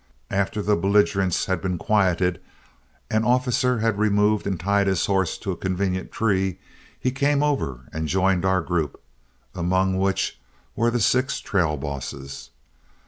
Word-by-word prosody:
After 100 +1 -1
the 105 +1 +3
belligerents 95 -1 +2
had 95 - -1
been 90 -2 -2
quieted, 90 -2 +1 0.7
and 110 0 +2
Officer 125 0 +2
had 110 -2 +1
removed 105 0 +2
and 95 -4 -2
tied 100 +2 +1
his 95 -3 +1
horse 95 -4 0
to 100 - -4
a - - -3
convenient 95 +1 -2
tree, 95 -4 0 0.4
he 130 - 0
came 140 +2 +1
over 135 - -1
and 80 0 -2
joined 95 +1 +2
our 95 -1 +2
group, 80 -3 -2 0.5
among 95 +2 +1
which 95 -10 0 0.4
were 115 +1 +2
the 120 +1 0
six 130 +5 +2
trail 85 -6 0
bosses. 70 -1 -6
95 Hz, 145 wpm, -24 LUFS, 90-105 Hz, 0.7 s, the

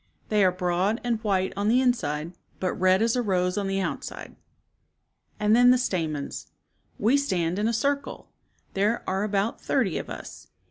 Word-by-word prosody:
They 210 -2 +3
are 185 - +4
broad 180 +4 0
and 235 -2 -1
white 190 -3 0
on 200 +1 -1
the 240 +3 +4
inside, 170 - 0 0.3
but 185 - -1
red 185 +3 +3
as 230 +1 +2
a 250 - +1
rose 180 -4 0
on 200 -1 -1
the 195 0 -1
outside." - - -5 1.0
And 210 +1 +4
then 245 +1 +6
the 255 - +6
stamens. 160 - -3 0.3
" - - -42
We 265 +5 +5
stand 185 -9 -1
in 215 - +1
a - - +1
circle. 280 +5 -2 0.4
There 210 +4 +1
are 190 +1 -1
about 205 +1 -1
thirty 230 - 0
of - - -8
us. - - -9
200 Hz, 180 wpm, -26 LUFS, 185-230 Hz, 1.0 s, then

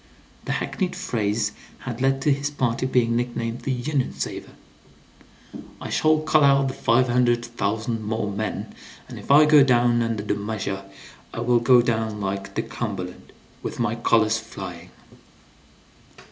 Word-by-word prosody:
(The - - -1
hackneyed 185 -2 -2
phrase 105 -1 -1 0.3
had 125 -1 -6
led 135 0 +1
to 145 - +4
his 140 +1 -2
party 130 -3 -1
being 120 -3 +2
nicknamed 120 -1 -2
"the 135 - -2
Union 130 +2 -1
savers.") - - -5 1.3
"I - - -7
shall 155 0 +3
call 155 -1 +3
out 140 -1 +4
the - - -4
five 130 0 +2
hundred 120 -1 +2
thousand 110 0 -2
more 110 0 -2
men, 105 +2 -4 0.3
and - - -9
if - - -13
I 145 +2 +7
go 150 -1 +7
down 120 -2 +3
under 115 -3 -1
the - - 0
measure 100 -2 -4 0.5
I 115 - -5
will 120 0 +3
go 120 +1 +5
down 110 -2 -1
like 100 -1 -4
the - - 0
Cumberland, 95 -6 -6 0.3
with - - -5
my 115 -2 +1
colors 115 -1 +2
flying!" 95 -6 -9
120 Hz, 155 wpm, -24 LUFS, 110-130 Hz, 1.3 s, I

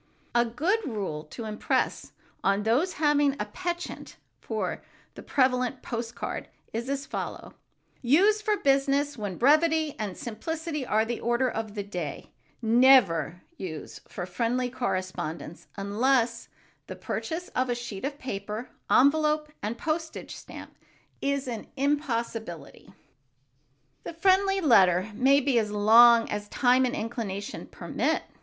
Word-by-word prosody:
A 240 0 +4
good 315 - 0
rule 195 - -4
to 225 +9 -8
impress 215 0 -1 0.3
on 200 +1 +2
those 260 - +2
having 290 -2 +3
a 210 - -1
penchant 350 - -5 0.2
for - - -3 0.3
the - - -10
prevalent 255 -1 +1
post 235 0 -4
card - - -5 0.3
is 235 +3 -3
as 275 0 -2
follows: - - -6 0.5
"Use 390 - +4
for 425 0 +1
business 280 0 +2
when 205 -6 -5
brevity 310 +3 +3
and 205 -4 -4
simplicity 300 +6 -4
are 220 -3 +1
the 235 0 -3
order 240 +2 +1
of 220 -3 -4
the 205 - -3
day; 175 -7 -6 0.3
never 220 - +4
use 160 -5 -7
for 175 - -5
friendly 240 +6 -1
correspondence 185 -9 -4
unless 230 +4 +1 0.4
the - - -6
purchase 345 +2 -4
of 255 0 -1
a 245 - +1
sheet 235 -5 -7
of 280 +1 -3
paper, 215 -2 -5 0.2
envelope 300 +2 +3
and 220 +3 -3
postage 320 +3 -3
stamp - - -11 0.5
is 280 -1 -1
an 230 -3 -5
impossibility." 235 - -2 1.1
The - - -6
friendly 385 +3 +3
letter 195 - +4
may 270 +5 +4
be 260 -3 +2
as 215 -2 -1
long 230 +3 +7
as 210 0 -4
time 255 0 +3
and 250 - -1
inclination 215 -3 -4
permit. - - -1
245 Hz, 135 wpm, -27 LUFS, 210-285 Hz, 1.1 s, long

